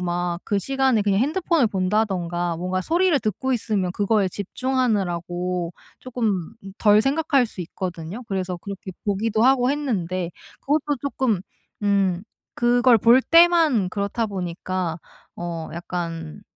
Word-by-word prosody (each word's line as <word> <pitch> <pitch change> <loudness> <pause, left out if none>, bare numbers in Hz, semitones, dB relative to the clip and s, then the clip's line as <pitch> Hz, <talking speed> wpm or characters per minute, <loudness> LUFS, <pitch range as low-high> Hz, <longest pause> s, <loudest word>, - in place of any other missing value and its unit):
막 175 -1 -2
그 205 - 0
시간에 265 +1 +1
그냥 200 0 +2
핸드폰을 315 0 +2
본다든가 185 -4 -1
뭔가 185 +2 -2
소리를 340 - +2
듣고 230 +5 -1
있으면 205 -6 -1
그거에 205 -1 +1
집중하느라고 180 -6 -2 0.3
쪼끔 225 -7 -2 0.2
덜 210 0 +5
생각할 275 0 +2
수 205 - -9
있거든요. 175 +4 -6
그래서 185 -3 -2
그렇게 195 +1 -8
보기도 215 +2 0
하고 255 0 +4
했는데 185 - -2 0.3
그것도 290 0 0
쪼끔 260 -8 0 0.4
음 195 -3 +1 0.3
그걸 245 0 +4
볼 235 +5 +5
때만 330 - +5
그렇다 200 +3 -1
보니까 180 -3 -3 0.4
어 170 -2 -5
약간 170 0 -5
200 Hz, 285 characters per minute, -23 LUFS, 180-250 Hz, 0.4 s, 덜